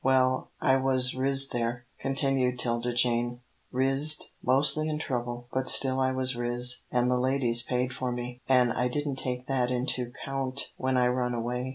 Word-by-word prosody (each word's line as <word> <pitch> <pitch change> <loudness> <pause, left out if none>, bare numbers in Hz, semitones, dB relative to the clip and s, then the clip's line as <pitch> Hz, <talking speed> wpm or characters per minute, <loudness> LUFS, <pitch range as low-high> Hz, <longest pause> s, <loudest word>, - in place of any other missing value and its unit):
"Well, 130 -1 +1
I 130 0 +2
was 130 -1 +1
riz 135 +1 +4
there," 120 +1 -4
continued 135 -2 -1
'Tilda 120 0 -2
Jane, 120 0 0 0.3
"rizzed 135 +4 +4
mostly 140 +4 +4
in 155 - -3
trouble, 120 -4 -5
but 130 0 -1
still 130 -1 +4
I 130 0 0
was 130 -1 -1
riz, 120 +1 0
an' 125 0 0
the 125 0 0
ladies 125 -2 +2
paid 125 +1 -3
for 130 -1 -4
me, 125 0 -7
an' 125 -2 +3
I 125 - -1
didn't 145 +1 -4
take 125 -1 -5
that 130 -3 -1
into 125 -1 0 0.2
'count 135 0 -3
when 130 0 -2
I 125 -1 +2
run 125 -1 -2
away." 125 +2 -4
125 Hz, 175 wpm, -26 LUFS, 125-135 Hz, 0.3 s, riz